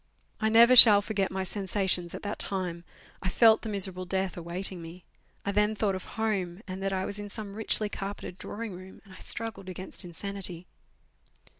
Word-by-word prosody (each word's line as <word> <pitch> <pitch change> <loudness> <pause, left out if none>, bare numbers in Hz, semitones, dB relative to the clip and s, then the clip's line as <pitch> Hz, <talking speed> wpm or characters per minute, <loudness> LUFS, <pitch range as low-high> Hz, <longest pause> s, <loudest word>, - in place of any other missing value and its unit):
I 220 - +1
never 235 +3 +6
shall 210 -4 +11
forget 200 -3 -2
my 190 0 -4
sensations 190 -2 -2
at - - -9
that 205 0 -5
time. 180 -3 -4 0.4
I 185 - -2
felt 225 +3 +4
the 225 - -6
miserable 190 -3 -3
death 190 0 -2
awaiting 175 +1 -5
nis. 165 +2 -11 0.4
I 200 - -1
then 210 +2 +1
thought 205 -2 0
of 185 - -6
home, 200 -4 -2
and 185 0 -7
that 195 0 -2
I 190 0 -2
was 205 - -5
in 205 0 -7
some 200 -1 -8
richly 215 0 +1
carpeted 195 -2 -7
drawiug 225 +3 -7
roorn 185 +1 -11
r - - -21
and 190 - -16
I - - -14
struggled 215 -4 -5
against 185 +2 -5
insanity. 180 0 -4
195 Hz, 190 wpm, -28 LUFS, 185-210 Hz, 0.4 s, shall